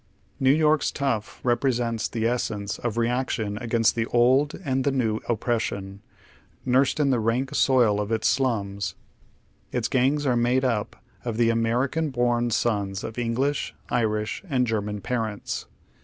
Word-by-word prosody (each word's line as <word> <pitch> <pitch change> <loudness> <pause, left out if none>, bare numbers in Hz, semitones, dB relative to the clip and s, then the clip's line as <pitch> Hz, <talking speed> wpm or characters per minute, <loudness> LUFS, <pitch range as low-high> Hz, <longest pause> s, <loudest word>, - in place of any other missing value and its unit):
New 130 -2 +3
York's 155 0 +3
tough 125 -7 -2
represents 120 -2 0
the 115 -2 -3
esseiiee 110 -4 -1
of 120 -2 -3
reaction 115 -3 -1
against 115 -2 +2
the 115 -1 -1
old 130 +5 +3
and 130 -1 0
the 140 - +2
new 115 -5 0
oppression, 105 -4 -2 0.6
imrsed 130 +3 +2
in 140 -2 +3
the 125 - +2
rank 120 +5 0
soil 120 -8 +3
of 105 +2 -4
its 110 -1 +1
slums. 100 -8 0 0.8
Its - - 0
gangs 135 +3 +1
are 125 -3 +2
made 125 +2 +2
up 110 -5 -1 0.3
of 115 -3 -3
the 115 -1 +4
American 125 +8 0
born 120 -2 +1
sons 100 -4 -1
of 115 - -5
English, 125 +5 -1 0.2
Irish, 110 -3 0
and 130 -3 +2
German 105 -2 -2
parents. 110 -4 -3
120 Hz, 145 wpm, -25 LUFS, 110-130 Hz, 0.8 s, the